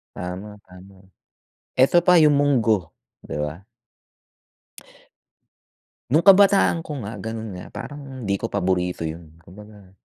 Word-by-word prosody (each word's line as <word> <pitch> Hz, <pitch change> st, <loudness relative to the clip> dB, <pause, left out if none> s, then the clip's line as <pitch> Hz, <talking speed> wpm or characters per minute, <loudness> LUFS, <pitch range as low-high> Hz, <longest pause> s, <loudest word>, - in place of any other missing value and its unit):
Tama, 95 Hz, +4 st, -7 dB
tama. 95 Hz, +1 st, -16 dB, 0.8 s
Eto 135 Hz, +7 st, +4 dB
pa, 180 Hz, -1 st, +6 dB
yung 150 Hz, -1 st, +5 dB
munggo, 115 Hz, -, +1 dB, 0.3 s
'di -, -, -6 dB
ba? 75 Hz, +5 st, -5 dB, 2.5 s
No'ng 155 Hz, +5 st, +3 dB
kabataan 195 Hz, -3 st, +5 dB
ko -, -, -7 dB
nga, 105 Hz, +2 st, -6 dB
gano'n 110 Hz, 0 st, -6 dB
nga. 90 Hz, -, -9 dB
Parang 135 Hz, +3 st, -9 dB
'di 100 Hz, -2 st, 0 dB
ko -, -, -3 dB
paborito 90 Hz, -3 st, -1 dB
yun. 80 Hz, 0 st, -8 dB
Kumbaga 100 Hz, +1 st, -15 dB
105 Hz, 120 wpm, -22 LUFS, 90-140 Hz, 2.5 s, pa